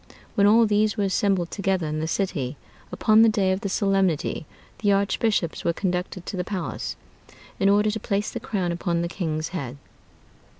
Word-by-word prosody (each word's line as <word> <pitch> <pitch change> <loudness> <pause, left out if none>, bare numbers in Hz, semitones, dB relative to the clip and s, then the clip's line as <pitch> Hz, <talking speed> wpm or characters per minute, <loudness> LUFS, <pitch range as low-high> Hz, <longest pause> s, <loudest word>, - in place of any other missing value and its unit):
When 200 0 +4
all 225 +2 +6
these 210 0 +2
were 205 - +1
assembled 195 -3 +1
together 195 -4 0
in 155 0 -2
the 160 - -2
city, 155 -8 -2 0.3
upon 215 0 +4
the 225 - +7
day 195 -3 +2
of 190 +1 -1
the 200 - -2
solemnity, 190 -6 0 0.3
the 205 -2 +2
archbishops 200 -2 +1
were 170 - +1
conducted 180 0 -3
to - - -5
the 180 - -1
palace, 180 -6 -4 0.6
in 195 - +4
order 210 +1 +4
to 220 - -3
place 205 -1 -1
the - - -4
crown 185 -5 -2
upon 170 0 -1
the - - -1
king's 160 -3 -3
head. 140 -7 -5
195 Hz, 180 wpm, -24 LUFS, 170-205 Hz, 0.6 s, the